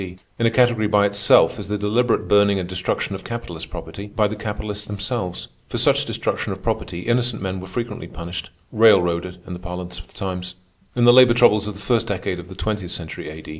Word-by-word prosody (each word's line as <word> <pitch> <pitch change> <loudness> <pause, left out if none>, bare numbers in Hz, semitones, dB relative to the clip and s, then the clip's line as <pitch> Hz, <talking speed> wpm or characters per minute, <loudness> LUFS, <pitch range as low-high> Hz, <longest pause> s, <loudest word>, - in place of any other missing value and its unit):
D. 90 -1 -7 0.2
In 115 - +3
a - - +4
category 120 -2 +3
by 105 -1 +4
itself 100 0 +4
is - - -7
the 105 +1 -1
deliberate 115 +4 +1
burning 100 -1 +4
and 90 -2 -3
destruction 95 +2 -2
of 95 0 -6
capitalist 90 -9 -6
property 100 +1 -8
by 105 0 +1
the 105 - -5
capitalists 105 0 -5
themselves. 105 -2 -3 0.2
For - - -4
such - - +3
destruction - - -2
of - - -7
property 85 0 -2
innocent 120 +1 0
men 95 -1 -3
were 95 - -8
frequently 115 +3 -5
punished—"railroaded" 90 +1 +1
in 90 - -7
the 90 - -7
parlance 90 0 -6
of 90 - -13
the - - -23
times. 90 -1 -5 0.4
In 120 - +2
the 120 - +8
labor 125 -2 +7
troubles 105 -4 +4
of 105 - -5
the - - -11
first 115 +1 0
decade 95 -2 -2
of 90 - -9
the 95 - -10
twentieth 105 -2 -3
century 80 -3 -6
A. 80 0 -9
100 Hz, 210 wpm, -22 LUFS, 90-110 Hz, 0.4 s, the